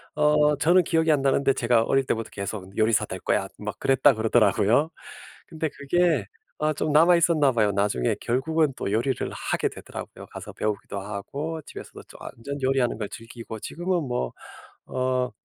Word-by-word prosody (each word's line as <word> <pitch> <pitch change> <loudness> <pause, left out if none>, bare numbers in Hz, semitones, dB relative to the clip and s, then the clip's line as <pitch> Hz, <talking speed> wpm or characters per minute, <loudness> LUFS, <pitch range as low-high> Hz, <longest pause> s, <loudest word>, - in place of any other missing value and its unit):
어 150 0 +4
저는 175 +5 +5
기억이 160 -1 +2
안 145 -2 +2
나는데 135 0 +2
제가 120 -2 +2
어릴 135 +3 +1
때부터 115 -3 -2
계속 100 -1 -6
"요리사 110 -1 +3
될 - - -6
거야." - - 0
막 - - -5
그랬다 135 +1 +4
그러더라고요. 110 +4 +3 0.6
근데 160 -1 -3
그게 150 - +1 0.3
아 155 0 +2
좀 150 - -2
남아 165 +4 +6
있었나 160 -5 +3
봐요. 110 -3 +2
나중에 100 -11 0
결국은 150 +5 +1
또 - - -3
요리를 120 +3 0
하게 - - -1
되더라고요. - - -9
가서 - - -9
배우기도 105 -1 -3
하고 140 +11 -5
집에서도 - - -10
조 - - -13
완전 140 +5 -7
요리하는 130 -4 +1
걸 105 -2 -3
즐기고 115 -1 -9
지금은 175 - -2
뭐 65 - -2 0.5
어 130 -1 -1
130 Hz, 360 characters per minute, -25 LUFS, 110-150 Hz, 0.6 s, 남아